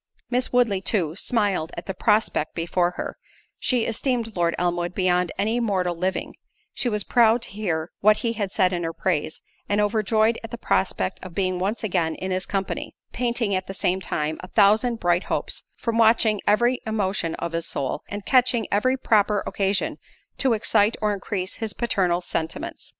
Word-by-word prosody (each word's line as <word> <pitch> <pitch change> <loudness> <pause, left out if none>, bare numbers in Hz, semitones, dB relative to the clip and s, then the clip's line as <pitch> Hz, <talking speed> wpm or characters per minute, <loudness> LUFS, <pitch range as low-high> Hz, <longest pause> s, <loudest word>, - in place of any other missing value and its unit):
Miss 250 +1 0
Woodley, 235 -6 +2
too, 175 -6 0
smiled 200 -7 0
at - - -6
the 195 - -3
prospect 200 -5 +1
before 175 +1 +1
her—she 245 -3 -3
esteemed 230 -1 -1
Lord 170 -1 +1
Elmwood 175 0 -1
beyond 180 -2 +2
any 220 +4 +1
mortal 185 -6 0
living—she 190 +6 -4
was 210 -2 -1
proud 230 +1 +4
to - - -3
hear 175 -6 -3
what 210 +1 +5
he 230 - +1
had 205 -4 -3
said 185 -3 +2
in 175 -1 -2
her 165 0 -2
praise, 160 -3 -2 0.3
and 205 - +2
overjoyed 215 +2 +2
at 225 - -6
the 235 - -6
prospect 95 - -1
of 185 -2 -9
being 185 -2 0
once 205 +6 -2
again 175 -6 0
in 190 0 -4
his 185 0 -2
company; 195 -2 -3 0.2
painting 235 -4 0
at 185 0 -1
the 195 - -6
same 185 0 0
time 155 -3 -2
a 185 - -8
thousand 220 +5 +3
bright 175 0 +1
hopes, - - -3
from 230 -1 -1
watching 220 -2 +4
every 240 +4 +3
emotion 195 -6 -1
of 170 - -4
his 165 0 -2
soul, 135 -2 -2
and 205 -1 -6
catching 250 -3 +3
every 255 +6 +2
proper 210 -4 +2
occasion 195 0 -1 0.4
to 265 -3 +3
excite 215 0 +2
or 210 -1 +1
increase 190 -1 -3
his 220 -2 -3
paternal 185 -7 +1
sentiments. 160 -2 -4
200 Hz, 175 wpm, -24 LUFS, 180-225 Hz, 0.4 s, what